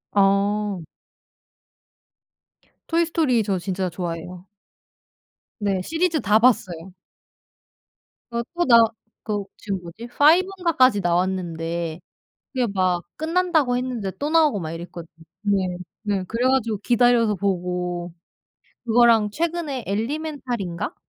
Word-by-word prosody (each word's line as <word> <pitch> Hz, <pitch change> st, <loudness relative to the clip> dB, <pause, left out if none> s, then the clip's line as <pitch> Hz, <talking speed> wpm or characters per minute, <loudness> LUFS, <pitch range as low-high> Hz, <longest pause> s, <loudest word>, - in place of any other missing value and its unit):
어. 200 Hz, -1 st, +2 dB, 2.1 s
토이 335 Hz, 0 st, +2 dB
스토리 290 Hz, -9 st, +1 dB
저 195 Hz, -2 st, -1 dB
진짜 185 Hz, 0 st, -2 dB
좋아해요. 175 Hz, +1 st, -6 dB, 1.1 s
네 195 Hz, -3 st, 0 dB
시리즈 325 Hz, -, 0 dB
다 215 Hz, 0 st, +4 dB
봤어요. 190 Hz, -7 st, +1 dB, 1.4 s
어 235 Hz, 0 st, -1 dB
또 350 Hz, -, +1 dB
나 235 Hz, -2 st, +7 dB, 0.5 s
그 210 Hz, -2 st, -1 dB, 0.2 s
지금 195 Hz, -3 st, -4 dB
뭐지? 175 Hz, +8 st, -9 dB
5 310 Hz, +9 st, +5 dB
인가까지 260 Hz, -, +3 dB
나왔는데 170 Hz, -2 st, -1 dB, 0.5 s
그게 250 Hz, -2 st, +1 dB
막 185 Hz, -2 st, +1 dB
끝난다고 320 Hz, -5 st, +1 dB
했는데 245 Hz, -6 st, -3 dB
또 290 Hz, +1 st, -2 dB
나오고 310 Hz, -10 st, +3 dB
막 155 Hz, -, -4 dB
이랬거든요. 170 Hz, 0 st, -8 dB, 0.3 s
네. 200 Hz, -3 st, +1 dB, 0.4 s
네 200 Hz, -3 st, -1 dB
그래가지고 235 Hz, +1 st, 0 dB
기다려서 235 Hz, 0 st, +3 dB
보고. 180 Hz, -2 st, -2 dB, 0.7 s
그거랑 230 Hz, -2 st, +5 dB
최근에 315 Hz, -, -2 dB
엘리멘탈인가? 240 Hz, -, -3 dB
210 Hz, 235 characters per minute, -23 LUFS, 185-255 Hz, 2.1 s, 나